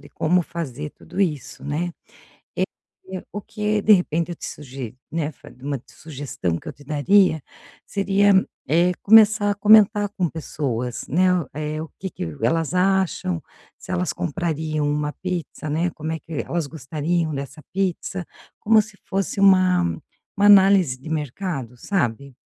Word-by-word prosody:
de 145 - -14
como 180 +3 +1
fazer 150 -3 -5
tudo 180 +4 -7
isso, 150 -9 -2
né. 165 +4 -2 0.6
É, - - +2 0.7
o 205 - -4
que 210 0 -1
de 215 - +6
repente 170 -2 +2
eu - - -3
te - - -8
sugi 130 -4 -7 0.2
né. 160 -2 -1
Fari 130 -2 -16
uma 140 -3 -3
sugestão 135 - -4
que - - -18
eu - - -5
te 145 - -18
daria, 160 +2 +3 0.4
seria, 200 0 +3 0.4
eh, 170 +4 +3
começar 215 -1 +6
a 205 - +1
comentar 210 0 +5
com 180 -3 +1
pessoas, 125 -7 -4
né. 180 +6 +3 0.3
É, 155 +1 -3
o 160 - -7
que 190 -1 -5
que - - -5 0.2
elas 165 +7 +1
acham, 185 -2 +1 0.4
se - - -8
elas 180 0 0
comprariam 160 -3 -2
uma 150 0 -1
pizza, 175 -4 -4
né. 170 +4 0
Como 155 +1 -5
é 160 - -3
que 165 - -13
elas 170 -4 -1
gostariam 155 +2 -2
dessa 140 +2 -6
pizza, 190 -1 -2 0.3
como 220 0 +5
se 210 -1 -14
fosse 195 +1 -2
uma 185 -2 +5 0.5
uma 205 +1 +4
análise 190 -9 +6
de 155 - -10
mercado, 150 - -4
sabe. 140 - -2
165 Hz, 155 wpm, -23 LUFS, 150-190 Hz, 0.7 s, de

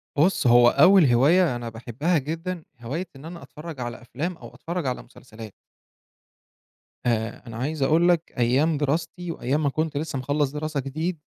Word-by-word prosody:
بُصّ، 160 -1 +2
هو 120 0 +7
أول 180 +7 +6
هواية 145 +5 +4
أنا 120 -1 -5
باحبها 125 +9 -1
جدًا، 165 +4 -4 0.2
هواية 155 +11 -4
إن 135 +3 -12
أنا 170 +1 -9
أتفرج 155 -2 -9
على 120 -1 -5
أفلام 155 +9 -4
أو 120 0 -12
أتفرج 170 +5 -4
على 125 - -3
مسلسلات. 110 -3 -12 1.5
آآ، 115 -2 -1
أنا 115 -1 -7
عايز 145 +5 -3
أقول 160 +6 +4
لك 170 -2 +1
أيام 135 +7 +2
دراستي 165 +4 -2
وأيام 145 +1 -1
ما 145 - +2
كنت 155 +1 -2
لسه 145 -2 -3
مخلّص 145 +1 0
دراسة 150 0 -3
جديد 155 +6 -3
145 Hz, 165 wpm, -24 LUFS, 125-165 Hz, 1.5 s, هو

